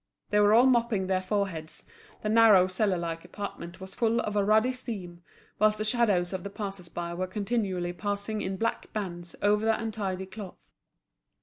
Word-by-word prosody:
They 210 - +4
were 210 +1 +6
all 240 +2 +7
mopping 235 -6 +2
their 185 0 +1
foreheads, 185 -5 -2 0.4
the 210 - 0
narrow 215 -4 +7
cellar 185 0 0
like 165 -1 -4
apartment 185 -4 -7
was 190 0 -8
full 230 0 +1
of 210 - -3
a 205 - +3
ruddy 215 +5 +4
steam, 195 -9 -7 0.4
whilst 215 0 +4
the 215 - -1
shadows 210 -6 +2
of 185 -2 -4
the 200 - -5
passers 195 -4 -5
by 170 0 -4
were 185 +2 -2
continually 195 -3 -1
passing 205 +2 -3
in 190 0 -3
black 230 +3 -2
bands 175 -5 -5
over 210 +1 +3
the 225 0 +2
untidy 205 -4 -3
cloth. 190 0 -9
200 Hz, 180 wpm, -28 LUFS, 185-215 Hz, 0.4 s, all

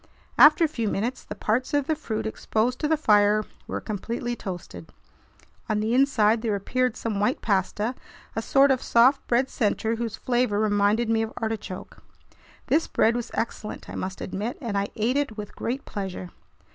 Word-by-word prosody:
After 305 +3 +8
a - - +5
few 235 -8 -3
minutes, 235 +7 -2
the - - -7
parts 250 +6 0
of 285 -2 +2
the 315 - +1
fruit 220 -7 -4
exposed 220 +2 -1
to 300 - 0
the 315 +1 +2
fire 210 -5 +4 0.2
were - - -3
completely 235 +4 -4
toasted. 175 - -8 0.8
On 215 -1 +1
the 220 +2 0
inside 235 -5 +3
there 220 -3 0
appeared 250 +4 -1
some 215 -3 -2
white 210 +6 0
pasta, 205 +3 0 0.4
a 225 - 0
sort 275 +4 +4
of 260 - +1
soft 255 +4 +4
bread 250 +2 +2
center 225 -1 0
whose 230 -2 -3
flavor 245 -5 +1
reminded 210 +2 +2
me 225 0 +2
of 225 0 -2
artichoke. 220 -5 -5 0.6
This 325 - +2
bread 230 +1 +2
was 240 -1 -3
excellent, 220 -1 -4
I - - -8
must 185 0 -5
admit, 210 +6 -4
and 230 -8 -4
I 200 0 +1
ate 235 +5 +1
it 280 -7 -1
with 210 -1 -7
great 255 +4 -3
pleasure. 190 -3 -5
225 Hz, 180 wpm, -25 LUFS, 210-250 Hz, 0.8 s, After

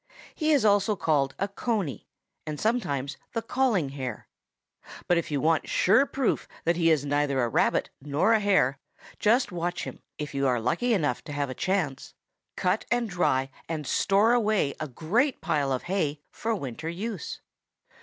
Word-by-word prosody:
He 310 -1 0
is 280 -7 +4
also 205 +1 +3
called 145 -6 +1
a 200 - 0
Coney 200 - -3 0.4
and 150 -1 -4
sometimes 140 - -1 0.2
the 230 - -1
Calling 230 - +1
Hare. 130 -4 -6 0.8
But 175 -1 +4
if - - -5
you 145 -2 0
want 160 +2 +1
sure 195 +6 +4
enough 280 - +1
proof 270 -4 0 0.2
that 170 +1 +2
he 165 -1 +3
is 150 -3 +2
neither 145 -1 +1
a - - +2
Rabbit - - +1
nor 145 +10 +2
a 220 - +4
Hare, 190 -10 +2 0.4
just 225 +1 +3
watch 175 0 -2
him, - - -7 0.2
if 150 -1 -5
you 140 0 +1
are 125 -2 +2
lucky 175 - +1
enough 145 - 0
to 150 - -7
have 145 -2 -2
a - - -3
chance, 165 -6 -2 0.4
cut 180 +4 0
and 235 -3 0
dry 135 -7 +1 0.2
and 155 -3 -3
store 205 - +3
away 215 - +2
a 155 - -3
great 210 - 0
pile 140 -2 0
of 130 - -1
hay 155 -6 -1
for 225 0 -2
winter 145 - -5
use. 195 +2 -5
170 Hz, 175 wpm, -27 LUFS, 140-215 Hz, 0.8 s, is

